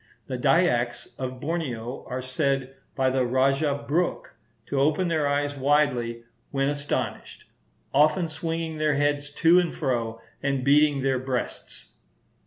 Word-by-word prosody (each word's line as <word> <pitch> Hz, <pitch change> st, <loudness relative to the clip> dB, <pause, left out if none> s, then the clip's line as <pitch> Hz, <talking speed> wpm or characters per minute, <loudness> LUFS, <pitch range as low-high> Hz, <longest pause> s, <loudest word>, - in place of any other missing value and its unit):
The 130 Hz, -, -4 dB
Dyaks 130 Hz, -4 st, +2 dB
of 130 Hz, -1 st, -4 dB
Borneo 135 Hz, -6 st, -3 dB
are 130 Hz, 0 st, -4 dB
said 135 Hz, 0 st, -1 dB, 0.2 s
by 130 Hz, -1 st, +2 dB
the 130 Hz, 0 st, +1 dB
Rajah 135 Hz, +3 st, +1 dB
Brooke 170 Hz, +5 st, -1 dB, 0.3 s
to 140 Hz, -, -2 dB
open 155 Hz, +5 st, +2 dB
their 155 Hz, -3 st, +1 dB
eyes 145 Hz, 0 st, 0 dB
widely, 130 Hz, -4 st, +1 dB, 0.3 s
when 135 Hz, 0 st, 0 dB
astonished, 145 Hz, 0 st, -3 dB, 0.5 s
often 155 Hz, +5 st, +4 dB
swinging 160 Hz, 0 st, -4 dB
their 155 Hz, -1 st, +2 dB
heads 145 Hz, 0 st, 0 dB
to 165 Hz, +4 st, +5 dB
and 175 Hz, -2 st, 0 dB
fro, 115 Hz, -5 st, -2 dB, 0.2 s
and 135 Hz, -2 st, 0 dB
beating 145 Hz, 0 st, +4 dB
their 135 Hz, -1 st, +1 dB
breasts. 130 Hz, -1 st, -5 dB
140 Hz, 135 wpm, -26 LUFS, 130-150 Hz, 0.5 s, to